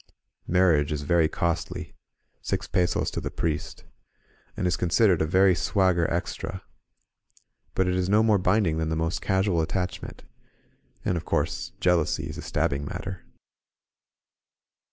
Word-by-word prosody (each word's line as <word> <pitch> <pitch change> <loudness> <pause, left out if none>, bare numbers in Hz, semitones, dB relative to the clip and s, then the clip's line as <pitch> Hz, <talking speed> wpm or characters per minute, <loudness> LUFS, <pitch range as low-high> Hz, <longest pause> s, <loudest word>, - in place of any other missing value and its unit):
Marriage 85 -5 +3
is 75 -1 -2
very 80 +2 +3
costly 85 0 -2 0.5
(six - - -2
pesos 90 -1 0
to - - -4
the - - -3
priest), 80 -3 -3 0.7
and - - -1
is 90 -1 +2
considered 90 0 +3
a 80 - +1
very 95 +3 +5
swagger 90 -1 +2
extra; 95 0 -3 1.1
but 95 - +2
it 90 - +1
is 90 0 0
no 105 +2 +4
more 110 -3 +4
binding 90 -3 +2
than 80 0 -1
the 80 - -1
most 80 +1 -1
casual 95 -3 +1
attachment. 90 +3 -4 0.8
And 90 - +1
of 80 - -6
course - - -1
jealousy 90 -4 +1
is - - -7
a - - -4
stabbing 70 0 -1
matter. 95 +5 -6
90 Hz, 140 wpm, -26 LUFS, 80-95 Hz, 1.1 s, very